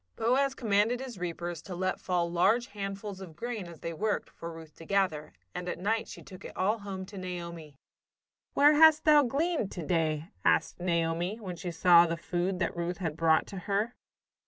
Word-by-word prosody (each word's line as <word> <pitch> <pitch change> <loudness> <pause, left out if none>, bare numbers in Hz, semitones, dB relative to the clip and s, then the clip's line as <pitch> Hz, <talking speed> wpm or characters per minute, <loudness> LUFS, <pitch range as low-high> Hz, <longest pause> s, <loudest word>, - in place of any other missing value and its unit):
Boaz 265 +4 +2
commanded 220 +1 +2
his 255 -7 -7
reapers 175 -1 -4
to 180 +1 -7
let 185 +1 -1
fall 175 -2 0
large 195 +8 +2
handfuls 195 -1 -6
of 170 -4 -10
grain, 220 0 -4
as 170 -2 -12
they 165 - -4
worked, 210 +6 -2
for 170 - -8
Ruth 160 -2 -11
to 165 - -11
gather, 170 -6 0 0.2
and 180 0 -4
at - - -3
night 215 +5 0
she - - -10
took 185 -1 -12
it - - -10
all 210 +4 +1
home 195 -2 -6
to 195 0 -9
Naomi. 170 -4 -7 0.8
"Where 290 +2 +7
hast 315 0 +7
thou 300 -1 +7
gleaned 285 - 0
to 170 -4 -5
day?" 160 -2 0
asked 80 - +2
Naomi, 170 +3 0
when 185 -5 -6
she 175 +1 -5
saw 170 0 +6
the 165 0 -2
food 175 +2 -2
that 175 -2 -1
Ruth 175 +1 -2
had 165 -5 -3
brought 160 -1 +3
to 195 - -8
her. 210 +5 0
185 Hz, 195 wpm, -30 LUFS, 170-215 Hz, 0.8 s, Where